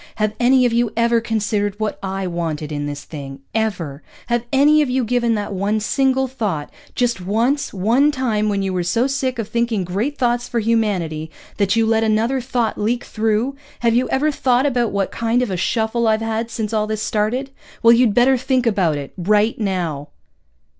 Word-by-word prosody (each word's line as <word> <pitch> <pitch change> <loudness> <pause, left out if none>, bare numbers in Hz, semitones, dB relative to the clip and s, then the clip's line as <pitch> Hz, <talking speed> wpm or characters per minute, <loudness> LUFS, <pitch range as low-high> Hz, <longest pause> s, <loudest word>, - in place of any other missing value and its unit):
"Have 215 -1 0
any 250 +1 +4
of 240 - +1
you 235 -2 +1
ever 235 0 +3
considered 210 -2 -1
what 215 -1 -2
I 195 0 -3
wanted 165 -4 -3
in 145 -1 -3
this 145 0 -6
thing? 135 -3 -9
Ever? 180 -10 -2 0.3
Have 240 0 0
any 295 +3 +5
of 290 - 0
you 255 0 +1
given 235 0 +1
that 205 -1 -3
one 200 +3 0
single 265 +4 +1
thought, 205 - -3 0.2
just 240 -6 0
once, 230 +10 0
one 235 +10 +2
time 225 -6 0
when 200 -1 0
you 190 -1 -2
were 180 - 0
so 200 +8 +1
sick 265 -2 -1
of 225 -3 -3
thinking 235 -4 0
great 210 +12 -2
thoughts 240 -1 0
for 235 - 0
humanity 195 -9 0 0.3
that 200 +1 +2
you 225 0 +3
let 225 0 +2
another 225 +4 +1
thought 240 -3 -1
leak 235 +4 0
through? 220 +4 -1 0.3
Have 235 -1 +3
you 245 +2 +1
ever 295 +3 +1
thought 255 -2 +1
about 245 -5 +1
what 200 -1 -1
kind 230 +2 0
of 235 - -3
a - - -1
shuffle 225 +4 0
I've 220 0 +2
had 225 +1 -2
since 220 -1 -4
all 215 -1 +1
this 215 0 -2
started? 240 +6 -1 0.3
Well, 230 0 +8
you'd 235 -3 +3
better 255 +2 +5
think 255 0 0
about 185 -9 +2
it. 140 -1 -7
_Right 210 +5 +2
now. 175 -8 -2
225 Hz, 195 wpm, -20 LUFS, 200-245 Hz, 0.3 s, Well